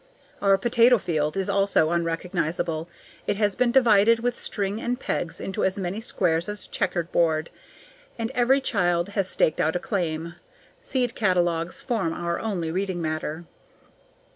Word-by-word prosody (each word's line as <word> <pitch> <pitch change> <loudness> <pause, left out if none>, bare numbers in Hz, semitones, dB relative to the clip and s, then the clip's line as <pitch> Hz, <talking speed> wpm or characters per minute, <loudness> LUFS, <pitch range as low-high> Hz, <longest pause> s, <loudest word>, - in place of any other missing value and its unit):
Our 195 -1 +4
potato 240 +3 +4
field 155 -3 -1
is 195 - 0
also 195 -5 +2
unrecognizable. 170 -1 -2 0.4
It - - +1
has 205 -1 +1
been 250 -1 +2
divided 230 -3 +5
with 245 0 -1
string 200 +1 -3
and 245 +1 -2
pegs 170 - -2
into 190 - -3
as 190 +1 +1
many 195 +2 -3
squares 175 -6 0
as 210 0 -5
a - - -19
checker 180 -1 -1
board, 160 -1 0 0.7
and 230 +1 -3
every 265 +2 +3
child 175 -7 +1
has 195 -2 -1
staked 155 - +1
out 160 +2 +1
a - - +1
claim. 170 -5 -2 0.5
Seed 255 - -1
catalogues 175 -4 0
form 205 -10 -1
our 170 0 -2
only 180 -7 -2
reading 190 0 -2
matter. 155 0 -3
190 Hz, 155 wpm, -25 LUFS, 170-220 Hz, 0.7 s, divided